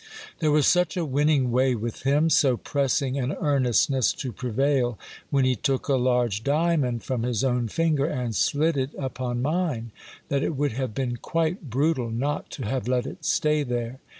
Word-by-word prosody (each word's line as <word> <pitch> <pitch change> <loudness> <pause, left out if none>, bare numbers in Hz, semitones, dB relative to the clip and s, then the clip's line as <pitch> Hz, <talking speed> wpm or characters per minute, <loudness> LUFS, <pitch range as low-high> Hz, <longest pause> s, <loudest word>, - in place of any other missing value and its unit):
There 155 - +2
was 150 -2 +4
such 180 0 +2
a 170 - 0
winning 145 -2 +2
way 130 +1 +2
with 115 0 -5
him, 145 +5 +2
so 135 -4 +4
pressing 140 0 0
an 130 +2 -1
earnestness 135 - +2
to 130 -4 -5
prevail, 125 +1 0 0.3
when 135 -2 +2
he 130 0 +2
took 130 +4 -1
a 140 - +2
large 125 -4 +1
diamond 145 -5 +1
from 130 -3 -2
his 120 0 -1
own 125 -3 +1
finger, 155 +2 +1
and 125 -8 -3
slid 145 - +1
it 135 +1 -2
upon 125 -2 -3
mine, 150 -7 -1 0.4
that 140 -1 +1
it 155 - -1
would 145 +1 0
have 125 -1 -4
been 125 -3 -2
quite 165 - -2
brutal 135 0 0
not 140 +6 -2
to 130 - -6
have 125 +1 -2
let 125 -1 +1
it - - -8
stay 150 0 +2
there. 120 -1 -3
130 Hz, 180 wpm, -25 LUFS, 125-145 Hz, 0.4 s, was